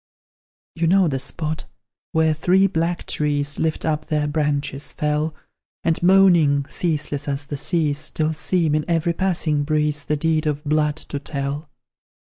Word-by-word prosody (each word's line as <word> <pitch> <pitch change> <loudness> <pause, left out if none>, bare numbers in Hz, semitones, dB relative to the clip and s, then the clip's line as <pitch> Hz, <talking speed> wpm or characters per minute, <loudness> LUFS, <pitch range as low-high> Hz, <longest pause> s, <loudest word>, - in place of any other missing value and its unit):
You 165 0 0
know 190 +1 +4
the 135 -3 -1
spot, 155 +3 -4 0.5
where 160 -1 +3
three 180 +5 +3
black 170 -2 -1
trees, 145 -1 -1
Lift 160 -1 -1
up 155 -1 -1
their 150 -1 0
branches 145 -2 -1
fell, 150 +1 -1 0.5
And 165 -1 +1
moaning, 175 -6 +5
ceaseless 150 -4 -2
as 140 0 -2
the 145 0 -5
seas, 150 -2 0
Still 155 0 -1
seem, 160 0 +1
in 155 0 +1
every 170 0 +1
passing 165 -5 0
breeze, 150 -1 0
The 150 - 0
deed 155 0 +1
of 150 0 -1
blood 150 0 +1
to 145 -2 -6
tell. 140 +1 -4
155 Hz, 150 wpm, -22 LUFS, 145-165 Hz, 0.5 s, moaning